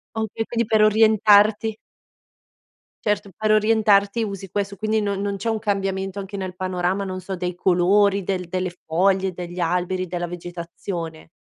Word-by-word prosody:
Okay, 220 0 -2
quindi 235 -2 -1
per 220 -1 +4
orientarti. 215 0 +4 1.3
Certo, 205 -1 0
per 215 0 +1
orientarti 215 0 +3
usi 195 -2 -5
questo, 200 0 -3
quindi 215 0 0
non 200 -1 -1
non 200 0 -2
c'è 220 +4 -3
un 220 -1 0
cambiamento 195 -2 -2
anche 195 +1 -6
nel 185 -1 -5
panorama, 185 +1 -1
non 185 -1 -4
so, 190 +1 -5
dei 180 0 -3
colori, 190 +3 +3
del 180 -1 -2
delle 185 +1 -2 0.2
foglie, 190 +3 +1
degli 175 0 -7
alberi, 180 +2 -1
della 175 0 -3
vegetazione. 170 -1 -7
195 Hz, 150 wpm, -22 LUFS, 180-210 Hz, 1.3 s, per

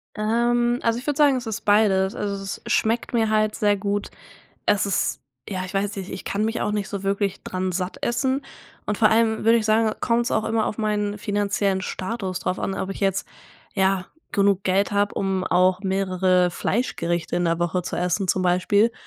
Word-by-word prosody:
Ähm, 240 +3 +1
also, 230 +1 +1
ich 255 - -11
würde 295 -1 0
sagen, 290 -3 +5
es 240 -2 -6
ist 220 - -3
beides. 200 -2 +3
Also, 200 -1 -2
es 195 - -5
schmeckt 230 +3 0
mir 225 -2 +2
halt 215 0 +2
sehr 205 -1 +2
gut. 200 +1 -2 0.6
Es 205 -1 +3
ist 195 - 0 0.3
ja, 185 -2 -3
ich 185 +2 -9
weiß 205 +1 -1
nicht, 190 -1 -6
ich - - -7
kann 205 +2 -1
mich 225 +1 -1
auch - - 0
nicht 210 -1 -2
so 200 -3 -5
wirklich 195 0 -1
dran 185 0 -3
satt 180 +1 -3
essen 265 +3 0 0.4
und 210 - -1
vor 215 - +5
allem 220 0 +3
würde 230 +1 +6
ich 220 - -2
sagen, 220 0 +3
kommt's 235 0 +1
auch 220 - +1
immer 220 -1 0
auf 215 - -4
meinen 210 -1 -1
finanziellen 205 -2 0
Status 185 -1 -3
drauf 185 - -2
an, 195 - -2
ob 190 - -3
ich 195 - -6
jetzt 195 -1 0 0.5
ja 190 -1 +1 0.2
genug 200 -2 +2
Geld 195 +1 +1
habe, 205 0 +1
um 190 -1 0
auch 185 0 +3
mehrere 185 -2 +2
Fleischgerichte 175 -6 -1
in 175 - +1
der 165 0 +1
Woche 175 +1 0
zu - - -4
essen 180 +2 0
zum 185 - +2
Beispiel 200 +5 +3
200 Hz, 200 wpm, -23 LUFS, 190-220 Hz, 0.6 s, würde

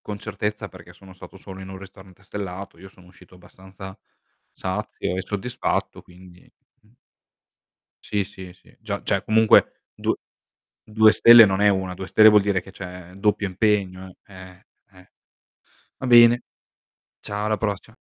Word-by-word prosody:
con 105 - -7
certezza 105 -1 -5
perché 90 -1 -15
sono 95 +1 -17
stato 95 +1 -14
solo 95 0 -11
in 95 - -10
1 95 0 -9
ristorante 95 -1 -16
stellato, 95 -2 -8
io 95 +1 -13
sono 90 -1 -21
uscito 90 - -20
abbastanza 95 +2 -14 0.5
sazio 95 -1 -5
e 95 - -3
soddisfatto 105 +4 -4
quindi, 90 0 -18 0.3
mh 110 +2 -28 1.1
Sì, 100 -2 -2
sì, 95 -2 -12
sì, 90 - -25
già 105 -2 -5
cioè 100 -1 -1
comunque 110 +1 +3
due - - -2 0.7
2 110 0 +4
stelle 115 +1 +8
non 95 0 -1
è 105 - +5
1, 95 -2 -2
2 95 +1 -8
stelle 110 - +5
vuol 105 -1 +5
dire 100 -1 0
che 95 - -14
c'è 90 -2 -11
doppio 105 +1 -1
impegno, 95 -2 -2
eh, 95 -1 -15 0.3
eh. 90 0 -20 0.9
Va 130 - -6
bene, 120 0 +6 0.8
ciao 105 +1 -5
alla 110 -1 -1
prossima. 105 +1 -5
95 Hz, 155 wpm, -22 LUFS, 95-105 Hz, 1.1 s, stelle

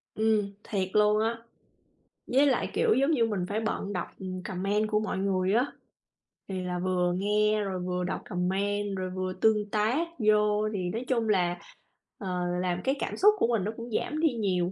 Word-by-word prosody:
Ừm, 215 -2 +1
thiệt 195 -3 -1
luôn 210 0 +4
á 230 +1 0 0.9
với 270 +3 +4
lại, 270 - +1
kiểu, 460 -2 +3
giống 275 +4 +2
như 245 -7 +3
mình 205 -5 -1
phải 210 +2 -1
bận 215 -2 -2
đọc, 180 - -2
ừm, 185 -1 -5
comment 200 +4 -1
của 210 - +3
mọi 215 -3 -2
người 190 0 +1
á, 245 +5 +2 0.8
thì 190 -1 -3
là 180 0 -2
vừa 180 -1 +1
nghe 210 +2 +2
rồi 190 -2 -3
vừa 180 0 -2
đọc 180 - -3
comment 195 +3 -1
rồi 185 0 -3
vừa 185 0 -3
tương 210 +2 +2
tác 225 +11 +1
vô 210 -1 +3
thì 185 -3 -2
nói 225 +7 -4
chung 230 -4 0
là, 175 -3 +2 0.6
ờ, 185 -3 -3 0.2
làm 180 -1 -1
cái 270 - +1
cảm - - -3
xúc 420 +2 +6
của - - +2
mình 230 -5 +1
nó 210 - -1
cũng 235 0 -7
giảm 305 +7 -1
đi 315 -4 +3
nhiều. 185 -6 0
205 Hz, 195 wpm, -28 LUFS, 185-220 Hz, 0.9 s, xúc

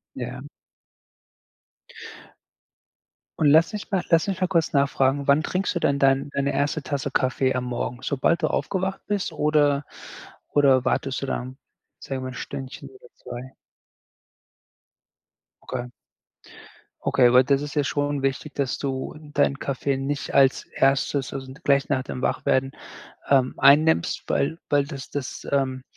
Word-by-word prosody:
Ja. - - -5 3.0
Und 155 - +2
lass 160 +7 +5
mich 210 - -6
mal 190 -3 +1
lass 165 +2 +4
mich 190 -1 -2
mal 185 - +3
kurz 165 -3 +1
nachfragen, 140 -1 +1
wann 145 +2 +4
trinkst 185 +4 -1
du - - -1
denn 140 0 +1
dein 135 +1 +2
deine 140 0 -1
1. 145 +1 -1
Tasse 140 -1 -3
Kaffee 130 0 +1
am 125 -1 -1
Morgen? 120 0 -3
Sobald 145 +4 +1
du - - +3
aufgewacht 190 0 -2
bist 200 -5 -1
oder 150 -2 +2 0.7
oder 135 -3 +4
wartest 130 +1 -1
du - - -2
dann, 130 0 -4 0.4
sage 135 - -5
ich - - -7
mal 130 - -4
1 130 - -8
Stündchen 135 +1 -7
oder 130 -2 -17
2? 125 +2 -9 2.1
Okay. 120 - -4 1.2
Okay, 125 -2 +4
weil 125 +1 +6
das 140 0 +2
ist 145 - -6
ja 145 -2 +1
schon 145 +1 -1
wichtig, 135 +2 -2
dass 140 -3 -1
du 135 -2 -3 0.2
deinen 140 -1 +2
Kaffee 140 0 -2
nicht 140 +2 -3
als 135 -1 +4
1., 135 0 0
also, 130 -1 -6
gleich 140 -1 +3
nach 130 -3 +1
dem 130 0 -6
Wachwerden, 135 +1 0 0.6
ähm, 130 -2 +3
einnimmst, 145 - +4
weil 160 +4 0
weil 145 -1 +3
das 140 -1 -8
das, 140 -3 -6
ähm 130 -2 0
140 Hz, 150 wpm, -24 LUFS, 130-145 Hz, 3.0 s, weil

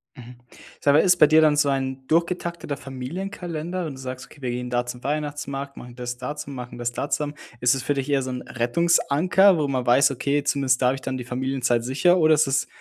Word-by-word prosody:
Mhm. 125 -2 -12 0.5
Sag 140 - +4
mal, 150 - +6
ist 180 +1 +5
bei 150 - +7
dir 155 +1 +5
dann 155 -1 +4
so 145 -1 +2
ein 135 -1 -2
durchgetackteter 170 -2 -1
Familienkalender, 170 +6 -5
wenn 155 - -5
du - - -12
sagst: 130 -1 -6
„Okay, 145 - -18
wir 125 - -3
gehen 125 +1 -4
da 120 0 0
zum 125 0 -7
Weihnachtsmarkt, 145 -1 -4
machen 120 0 -10
das 125 0 -5
da 125 +4 -5
zu 145 - -7
machen, 125 -3 -8
das 120 0 -2
da 140 +4 -4
zusammen.“ 145 -1 -2 0.3
Ist 125 +1 +4
es 130 - -4
für 145 - 0
dich 135 0 -3
eher 140 -1 +2
so 130 - -4
'n 125 -1 -4
Rettungsanker, 170 +8 +3
wo 150 -2 0
man 130 -2 -1
weiß: 135 +4 +5
„Okay, 140 +2 -1
zumindest 140 -4 +1
da 125 - +4
habe 130 - +2
ich 135 - -9
dann 130 0 -3
die 125 - -5
Familienzeit 125 -1 -1
sicher“ 175 +8 +3
oder 160 -2 +5
ist 155 -1 +3
das 135 -1 0
140 Hz, 240 wpm, -24 LUFS, 125-155 Hz, 0.5 s, bei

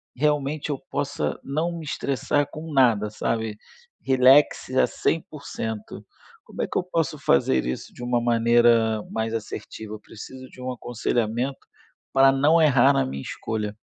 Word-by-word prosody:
realmente 150 +1 0
eu 140 -3 -2
possa 145 0 -2
não 165 +5 -2
me 165 - -7
estressar 145 0 -1
com 160 +2 -8
nada, 115 -7 +3
sabe? 110 0 -2 0.4
Relaxe 130 0 +4
a - - +4
100%. 140 -9 -4 0.4
Como - - -7
é - - 0
que - - -3
eu - - +1
posso 165 -4 -2
fazer 70 - +2
isso 65 +1 -5
de - - -12
uma 120 -1 0
maneira 115 -2 +3
mais 110 0 -2
assertiva? 110 -1 -6
Eu 110 - -7
preciso 130 +5 -11
de 130 - -14
um 130 0 -3
aconselhamento, 120 +1 -2 0.6
para 135 0 +6
não 150 +5 +4
errar 135 -3 +5
na 135 - +1
minha 70 +1 -5
escolha. 105 +6 -4
130 Hz, 150 wpm, -24 LUFS, 110-145 Hz, 0.6 s, para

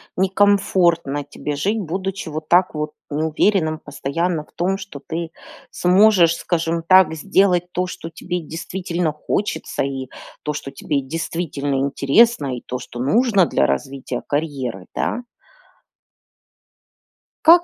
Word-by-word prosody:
некомфортно 185 -6 +2
тебе 145 +1 -5
жить, 205 +9 0
будучи, 190 0 -4
вот 155 0 -5
так 180 -1 +4
вот, 150 0 -2 0.2
неуверенным 155 +2 +1
постоянно 155 +3 -2
в - - -28
том, 190 +3 0
что 190 -8 -9
ты 165 0 -4 0.4
сможешь, 180 -2 +5
скажем 165 -1 -1
так, 185 -4 +6
сделать 180 0 +2
то, 180 0 -1
что 165 -2 -7
тебе 180 +1 -4
действительно 170 0 -3
хочется, 195 +7 -2
и 135 -1 -3 0.4
то, 150 - -2
что 145 -1 -5
тебе, 140 +1 -2
действительно, 145 -1 -2
интересно, 140 - +3
и 120 - -7
то, 125 - -4
что 125 -1 -9
нужно 200 - +3
для 70 - +2
развития 130 - -3
карьеры, 135 - -2
да. 245 - -1 2.2
Как 340 +2 +8
165 Hz, 125 wpm, -21 LUFS, 145-185 Hz, 2.2 s, Как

